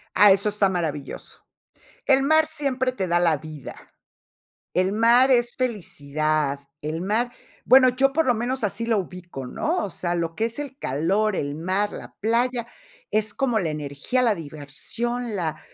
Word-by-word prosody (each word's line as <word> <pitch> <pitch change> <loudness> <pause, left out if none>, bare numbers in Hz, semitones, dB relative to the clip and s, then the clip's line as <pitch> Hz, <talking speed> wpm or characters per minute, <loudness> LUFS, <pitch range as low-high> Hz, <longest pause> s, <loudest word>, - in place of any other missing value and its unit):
Ah, 205 -1 +8
eso 200 +2 +3
está 205 -1 +2
maravilloso, 155 -6 -5 0.6
el 270 -1 +4
mar 315 +2 +4
siempre 275 -4 -1
te 195 -7 -3
da 175 0 +2
la 165 -4 +3
vida, 155 -2 -9 1.0
el 185 +1 +2
mar 235 +4 +5
es 240 -2 +3
felicidad, 155 - -1 0.2
el 155 +2 -3
mar, 220 +6 0 0.3
bueno, 260 0 +7
yo 270 +2 +2
por 320 +3 +2
lo 250 - +4
menos 245 +3 -2
así 220 +3 -1
lo 225 -2 +2
ubico, 175 -7 -7
¿no?, 330 - -1
o - - -5
sea, 175 -1 -2
lo 165 -1 -2
que 225 - 0
es 230 +4 -4
el 275 -2 -6
calor, 190 - 0
el 145 0 -2
mar, 185 +6 -1
la - - -9
playa, 235 +2 0 0.4
es 215 0 0
como 245 -5 +1
la 170 -5 -1
energía, 150 - -2
la 235 -3 +3
diversión, 205 - -5
la, 165 -4 -2
210 Hz, 170 wpm, -24 LUFS, 165-245 Hz, 1.0 s, Ah